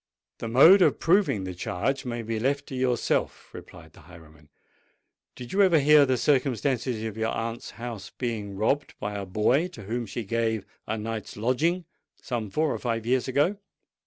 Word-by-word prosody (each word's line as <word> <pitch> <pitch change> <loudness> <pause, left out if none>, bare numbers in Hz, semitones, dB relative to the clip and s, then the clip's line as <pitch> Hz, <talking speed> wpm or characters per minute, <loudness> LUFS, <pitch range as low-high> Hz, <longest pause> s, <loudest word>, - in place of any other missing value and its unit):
"The 115 - -4
mode 160 - +7
of - - +4
proving 170 - +2
the 95 -1 -5
charge 110 +10 -2
may 120 -1 -4
be 115 0 -3
left 140 +4 0
to 130 - -6
yourself," 125 -2 -1
replied 80 0 -12
the - - -17
highwayman. 80 -4 -17 0.9
"Did 125 -1 -9
you 200 - +3
ever 185 -4 +5
hear 150 0 +6
the 130 -1 +1
circumstance 130 -1 +1
of 110 -3 -3
your 110 0 0
aunt's 115 +1 -4
house 115 -4 -6
being 110 -5 -4
robbed 135 +8 0
by 105 0 -4
a 100 -1 -5
boy 115 - +2
to 120 - -12
whom 115 +3 -3
she 115 +4 -5
gave 110 0 -1 0.2
a 110 - -2
night's 110 -1 -5
lodging, 155 +11 0 0.3
some 115 -4 -4
four 155 +7 0
or - - -4
five 115 -2 -2
years 130 +2 +1
ago?" 145 +10 +1
120 Hz, 180 wpm, -26 LUFS, 110-140 Hz, 0.9 s, mode